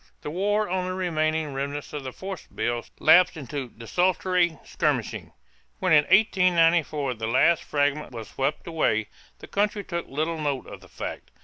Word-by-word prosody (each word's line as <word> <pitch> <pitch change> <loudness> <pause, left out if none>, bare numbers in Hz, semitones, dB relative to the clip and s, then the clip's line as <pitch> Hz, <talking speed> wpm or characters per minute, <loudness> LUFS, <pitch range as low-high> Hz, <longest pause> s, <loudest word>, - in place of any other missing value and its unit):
The 150 - -5
war 205 +5 +1
on 185 0 -1
the 185 - -3
remaining 155 -4 0
remnants 140 +2 -4
of 145 -2 -4
the 130 - -5
"force 190 +5 -7
bills" 120 0 -3
lapsed 175 +2 +6
into 140 -3 -5
desultory 175 +7 +1
skirmishing. - - -2 0.5
When - - 0
in 150 -2 +6
1894 170 -8 +3
the 110 -1 -4
last 145 +8 +3
fragment 145 0 0
was 115 -3 -7
swept 135 +3 -2
away, 155 -10 0 0.3
the - - -12
country 205 0 0
took 170 -2 -4
little 155 +4 -2
note 145 -4 -2
of - - -10
the - - -16
fact. - - -7
155 Hz, 165 wpm, -25 LUFS, 140-180 Hz, 0.5 s, lapsed